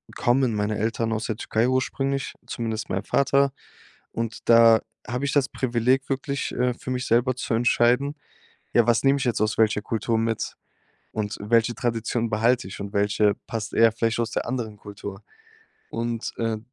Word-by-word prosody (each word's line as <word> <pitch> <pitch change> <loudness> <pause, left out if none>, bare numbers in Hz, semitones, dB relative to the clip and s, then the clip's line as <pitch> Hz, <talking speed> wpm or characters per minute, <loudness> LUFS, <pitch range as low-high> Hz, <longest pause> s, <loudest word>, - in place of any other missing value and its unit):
kommen 125 0 +2
meine 105 0 -1
Eltern 115 +1 -1
aus 110 +1 -2
der 110 - -2
Türkei 110 +1 0
ursprünglich, 135 +1 -1
zumindest 115 -2 -4
mein 95 +1 -2
Vater. 140 +2 +2 0.6
Und 115 0 -5
da 115 -1 +7 0.3
habe 125 +4 -2
ich 140 - -1
das 140 -2 +2
Privileg, 130 +1 0
wirklich, 140 +1 -2
äh, 125 0 +1
für 130 - -6
mich 125 0 -2
selber 120 +2 +2
zu 125 - -3
entscheiden: 120 +4 +2 0.6
Ja, 120 -2 +5
was 120 -1 +3
nehme 135 +1 +4
ich 135 - -2
jetzt 120 -4 0
aus 110 0 +1
welcher 110 -1 +3
Kultur 115 +1 -1
mit 115 0 -2 0.6
und 105 -2 -3
welche 115 +2 +2
Tradition 115 -1 -1
behalte 115 +1 +2
ich 95 - -9
und 100 0 -6
welche 105 0 +2
passt 110 -1 -4
eher 115 0 +5
vielleicht 115 0 0
aus 115 -1 -2
der - - -2
anderen 115 -4 -3
Kultur? 100 0 -9 0.7
Und, 115 0 -3
äh, 115 -1 -1
115 Hz, 170 wpm, -24 LUFS, 110-125 Hz, 0.7 s, da